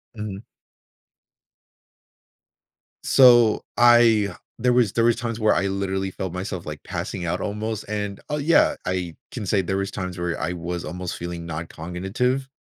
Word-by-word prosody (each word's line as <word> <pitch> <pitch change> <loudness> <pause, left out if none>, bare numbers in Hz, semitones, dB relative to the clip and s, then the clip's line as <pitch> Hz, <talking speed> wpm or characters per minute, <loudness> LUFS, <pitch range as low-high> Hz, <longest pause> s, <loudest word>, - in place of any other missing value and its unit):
Mhm. 105 -2 -5 2.6
So, 120 -4 +6
I 115 -5 +5 0.2
there 125 +1 +2
was 120 -5 +3
there 115 0 +2
was 120 - +4
times 115 0 -4
where 110 0 +3
I 100 - +1
literally 95 0 -2
felt 95 -2 -5
myself, 95 -1 -5
like, 75 -1 -7
passing 90 - -4
out 90 +3 -1
almost, 105 +1 -3
and 105 -2 -3
Oh, 150 - -1
yeah. 155 +3 +4
I 90 -3 -2 0.2
can 110 -5 -5
say 95 0 +2
there 95 +2 -2
was 100 0 -2
times 95 -2 -5
where 85 -1 -2
I 85 - -2
was 85 0 -4
almost 90 +3 -5
feeling 85 -1 -6
noncognitive. 90 - -2
100 Hz, 150 wpm, -23 LUFS, 90-115 Hz, 2.6 s, So